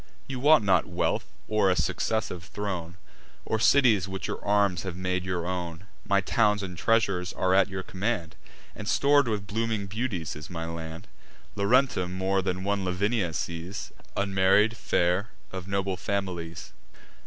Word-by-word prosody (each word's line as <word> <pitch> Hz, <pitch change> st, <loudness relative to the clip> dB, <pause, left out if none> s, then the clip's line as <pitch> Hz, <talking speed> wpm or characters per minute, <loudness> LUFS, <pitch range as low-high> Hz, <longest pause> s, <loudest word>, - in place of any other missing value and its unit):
You 135 Hz, -2 st, -5 dB
want 150 Hz, -1 st, +6 dB
not 95 Hz, -4 st, +3 dB
wealth, -, -, 0 dB, 0.2 s
or 105 Hz, -3 st, +3 dB
a 90 Hz, -, +3 dB
successive 100 Hz, -4 st, -1 dB
throne, 90 Hz, -5 st, -4 dB, 0.5 s
Or 110 Hz, -, 0 dB
cities 115 Hz, -7 st, +5 dB
which 95 Hz, 0 st, -5 dB
your -, -, -4 dB
arms 100 Hz, -4 st, +2 dB
have 95 Hz, -3 st, -5 dB
made 90 Hz, 0 st, -1 dB
your 90 Hz, -2 st, -2 dB
own: 90 Hz, 0 st, -4 dB, 0.2 s
My 100 Hz, -1 st, +3 dB
towns 105 Hz, 0 st, +2 dB
and 90 Hz, -2 st, -5 dB
treasures 95 Hz, -3 st, +1 dB
are 95 Hz, 0 st, +1 dB
at 95 Hz, 0 st, +5 dB
your 95 Hz, 0 st, -4 dB
command, 95 Hz, -5 st, -2 dB, 0.4 s
And 105 Hz, -, -7 dB
stor'd 140 Hz, +1 st, +4 dB
with 105 Hz, -3 st, -1 dB
blooming 110 Hz, 0 st, -1 dB
beauties 100 Hz, -, -3 dB
is 75 Hz, 0 st, -9 dB
my 85 Hz, -2 st, -4 dB
land; 80 Hz, +3 st, -7 dB, 0.5 s
Laurentum 100 Hz, -3 st, +2 dB
more 95 Hz, +1 st, +1 dB
than 95 Hz, 0 st, -2 dB
one 100 Hz, 0 st, 0 dB
Lavinia 95 Hz, +1 st, 0 dB
sees, 85 Hz, +4 st, -5 dB, 0.3 s
Unmarried, 100 Hz, +3 st, +3 dB
fair, 90 Hz, 0 st, +1 dB, 0.2 s
of 95 Hz, -1 st, -6 dB
noble 100 Hz, -1 st, -1 dB
families. 90 Hz, -4 st, -4 dB
95 Hz, 155 wpm, -27 LUFS, 90-105 Hz, 0.5 s, want